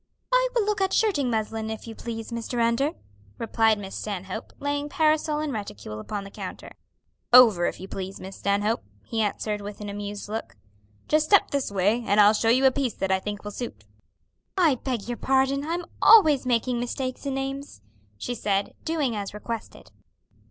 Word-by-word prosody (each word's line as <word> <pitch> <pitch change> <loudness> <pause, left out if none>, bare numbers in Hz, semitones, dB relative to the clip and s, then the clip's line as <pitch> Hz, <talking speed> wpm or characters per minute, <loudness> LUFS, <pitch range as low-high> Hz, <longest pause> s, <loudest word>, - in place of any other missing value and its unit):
"I - - +5
will 455 -4 +3
look 420 -1 0
at 385 0 +1
shirting 310 - +2
muslin, 220 -1 -2
if 220 -1 -6
you 225 - -7
please, 225 0 -6
Mr. 235 +1 -3
Under," 235 +6 +2 0.4
replied 225 -1 +2
Miss 195 -1 -7
Stanhope, 190 -3 -5
laying 285 +1 -2
parasol 310 0 +2
and 305 -3 -2
reticule 105 - -6
upon 205 - -5
the 195 - -10
counter. - - -8 0.6
"Over, 225 -8 +8
if - - -4
you 190 - -7
please, 190 0 -6
Miss 190 +1 -8
Stanhope," 205 +3 0 0.2
he 225 -1 -1
answered 210 0 -1
with 205 0 -7
an 210 -1 -6
amused 205 0 -5
look. 220 +2 -5 0.5
"Just 305 0 +2
step 405 - +5
this 280 -6 -1
way, 205 +5 +1
and 205 -1 +2
I'll 210 +1 +7
show 225 +1 +1
you 255 +3 +4
a 265 - +7
piece 260 -4 -1
that 195 - -1
I 190 - +3
think 205 +1 -5
will 210 - -5
suit." 240 +3 -6 0.7
"I 335 -6 +5
beg 250 -4 -3
your 240 -1 -3
pardon, 270 +1 +2
I'm 340 +3 -2 0.2
always 310 - +7
making 240 0 +1
mistakes 255 +2 -3
in 270 - -1
names," 270 - -5 0.3
she 245 - -3
said, 200 -3 -1
doing 300 -8 0
as 200 -1 -5
requested. 230 +2 -7
230 Hz, 185 wpm, -26 LUFS, 205-275 Hz, 0.7 s, Over